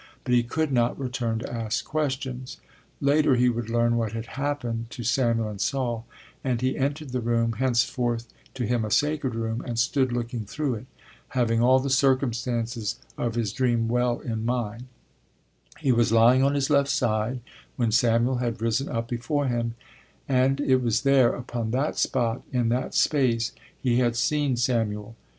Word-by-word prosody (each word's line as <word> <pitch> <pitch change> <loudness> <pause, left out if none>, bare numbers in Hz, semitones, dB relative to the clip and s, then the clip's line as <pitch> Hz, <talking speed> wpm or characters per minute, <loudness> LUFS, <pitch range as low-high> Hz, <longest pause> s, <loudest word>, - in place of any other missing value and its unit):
But 125 - -1
he 120 - +5
could 155 +6 -1
not 120 -2 +1
return 125 -4 -2
to 115 - -5
ask 115 -2 -2
questions: 130 -4 -3 0.4
later 145 -1 +3
he 125 0 +4
would 120 -1 -3
learn 120 0 +2
what 115 -2 -1
had 115 0 -4
happened 130 -5 -3
to 125 -1 -7
Samuel 115 -2 +1
and 105 -1 -6
Saul, 120 -4 -1 0.4
and 125 -3 0
he 130 +2 0
entered 140 +1 -2
the 125 0 -1
room, 115 0 +1
henceforth 120 -2 0 0.3
to 125 -2 -2
him 120 +1 0
a 110 - -3
sacred 145 -1 +1
room, 115 0 -2
and 120 -2 -5
stood 130 +2 +2
looking 120 -1 -3
through 140 +5 -2
it, 115 +2 -6 0.4
having 115 -3 +1
all 130 +2 +5
the 135 +1 -2
circumstances 120 -4 +1 0.2
of 115 -1 -2
his 110 -3 -1
dream 120 -3 +1
well 120 0 +1
in 110 -2 -3
mind: 120 -1 -2 0.9
he 135 - +1
was 120 -2 +3
lying 115 +3 +6
on 140 +1 +3
his 140 +1 0
left 140 -1 +3
side 120 +1 0 0.3
when 115 -3 0
Samuel 120 +2 +3
had 120 -3 -2
risen 115 +5 0
up 115 -1 -2
before 125 +4 -1
him, 120 -2 -1 0.5
and 135 +1 +2
it 130 -2 +3
was 120 -4 +1
there, 135 -3 +4
upon 120 -2 -4
that 130 +6 0
spot, 120 -2 0
in 120 -3 +1
that 125 +2 -1
space 120 -6 +2 0.3
he 125 -2 +2
had 120 -2 +2
seen 140 +1 +1
Samuel. 115 -3 -1
120 Hz, 175 wpm, -26 LUFS, 115-130 Hz, 0.9 s, lying